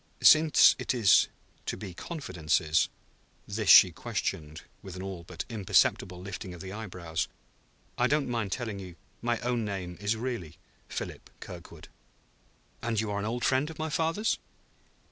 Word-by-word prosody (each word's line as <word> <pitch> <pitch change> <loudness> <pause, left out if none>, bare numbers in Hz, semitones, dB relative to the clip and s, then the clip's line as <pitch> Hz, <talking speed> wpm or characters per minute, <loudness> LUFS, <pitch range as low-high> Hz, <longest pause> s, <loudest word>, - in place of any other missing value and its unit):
"Since 155 0 +7
it - - -1
is 110 -6 +5 0.4
to - - -2
be 95 -4 -7
confidences" 85 - 0 0.6
(this - - -2
she - - +10
questioned 75 -1 -4 0.2
with 95 -2 -9
an 95 - -6
all 95 -3 -6
but 85 0 -6
imperceptible 95 -4 +2
lifting 95 -1 -7
of 85 - -10
the 95 0 -7
eyebrows), 90 -6 -4 0.7
"I 125 - +4
don't 150 +1 +1
mind 115 -5 -2
telling 110 -5 -3
you 90 -3 -9 0.3
my 120 0 0
own 120 -1 0
name 95 -4 -5
is 105 +2 +1
really 115 -9 -4 0.3
Philip - - -6
Kirkwood." - - -10 0.9
"And 115 -2 -1
you 110 -1 -1
are 100 - -1
an 100 - -3
old 120 +2 -2
friend 135 +3 +2
of 160 - -9
my 160 0 -3
father's?" 165 +9 0
105 Hz, 155 wpm, -29 LUFS, 90-125 Hz, 0.9 s, she